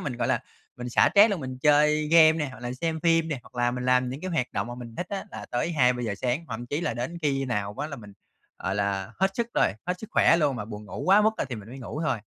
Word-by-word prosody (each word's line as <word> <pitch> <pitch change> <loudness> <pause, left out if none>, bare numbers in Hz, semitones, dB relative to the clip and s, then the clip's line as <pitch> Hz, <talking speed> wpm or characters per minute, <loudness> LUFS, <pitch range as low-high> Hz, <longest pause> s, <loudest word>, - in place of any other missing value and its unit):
mình, 125 - -4
gọi 120 -1 -1
là, - - +1 0.4
mình 125 0 -6
xả - - +5
stress 210 +2 +7
luôn 195 -6 -2
mình 130 -1 -6
chơi 150 +1 +3
game 160 -1 +7
nè 150 -3 -2
hoặc 125 -1 -12
là 120 0 -4
xem 160 +4 -3
phim 165 -1 +3
nè, 145 - -2
hoặc - - -19
là 120 0 +1
mình 125 0 -4
làm 125 0 +3
những 135 +4 -6
cái 185 - -4
hoạt 155 -8 0
động - - -2
mà 120 - -6
mình 120 -2 -9
thích 175 - -3
á 200 0 -4
là - - -8
tới 125 +8 -1
2:00-3:00 125 -6 +1
sáng, 125 +9 -2
thậm 115 +1 -5
chí 145 +5 -2
là 165 - -2
đến 130 +8 -4
khi 135 -2 +1
nào 105 -5 -2
á 150 - -2
là 140 -2 -7
mình, 105 -3 -12 0.5
gọi 95 - -2
là, 100 +1 -2
hết 190 0 +3
sức 235 -1 0
rồi, - - +3
hết 180 0 -2
sức 220 - -8
khỏe 165 - +5
luôn 145 -5 +1
và 105 - -4
buồn 105 -1 -8
ngủ 120 - -7
quá 200 +3 +6
mức, 220 - +4
a, - - -1
thì 130 -3 -6
mình 105 +1 -10
mới 130 +3 -9
ngủ 140 +4 -6
thôi. 155 - 0
130 Hz, 295 wpm, -26 LUFS, 120-160 Hz, 0.5 s, stress